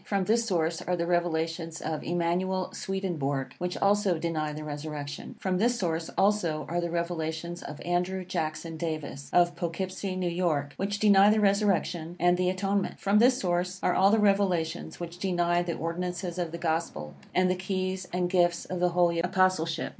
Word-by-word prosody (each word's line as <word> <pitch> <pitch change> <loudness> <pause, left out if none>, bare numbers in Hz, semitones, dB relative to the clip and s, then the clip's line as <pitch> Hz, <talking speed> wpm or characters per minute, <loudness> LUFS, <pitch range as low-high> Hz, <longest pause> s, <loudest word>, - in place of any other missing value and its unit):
From 200 -2 0
this 225 +4 +2
source 165 -3 0
are 180 - -1
the 170 -1 -1
revelations 165 -1 -1
of 155 -1 -3
Emmanuel 175 +2 -1
Swedenborg, 155 -9 -2
which 180 0 -2
also 200 -3 +2
deny 160 -2 -2
the 155 +1 -6
resurrection. 145 -1 -6
From 185 -1 0
this 240 +3 +2
source, 165 -5 -1
also, 180 -7 +2
are 175 +3 -1
the 170 - -2
revelations 170 0 -3
of 145 - -8
Andrew 180 +2 -1
Jackson 160 -1 -3
Davis, 155 -4 -4
of 175 -1 +4
Poughkeepsie, 185 +2 -3
New 185 -1 -1
York, 165 -5 0
which 200 +1 -2
deny 205 -1 +6
the 215 +1 +4
resurrection 195 -5 +1
and 175 +1 +4
the 180 0 +1
atonement. 195 +1 -1
From 200 +1 +3
this 250 +2 +5
source 180 +1 -1
are - - +3
all 195 +1 +5
the 220 - +4
revelations 195 -6 +1
which 175 0 -7
deny 175 -2 +1
the 175 -1 -2
ordinances 175 +1 -3
of 170 -2 -2
the 170 - -5
Gospel, 160 - -2 0.2
and 185 0 +4
the 185 - +1
keys 185 0 -3
and 180 0 0
gifts 175 -1 +2
of 185 - -4
the 180 0 +3
Holy 170 -1 +3
Apostleship. 180 -2 +1
175 Hz, 175 wpm, -28 LUFS, 165-190 Hz, 0.2 s, deny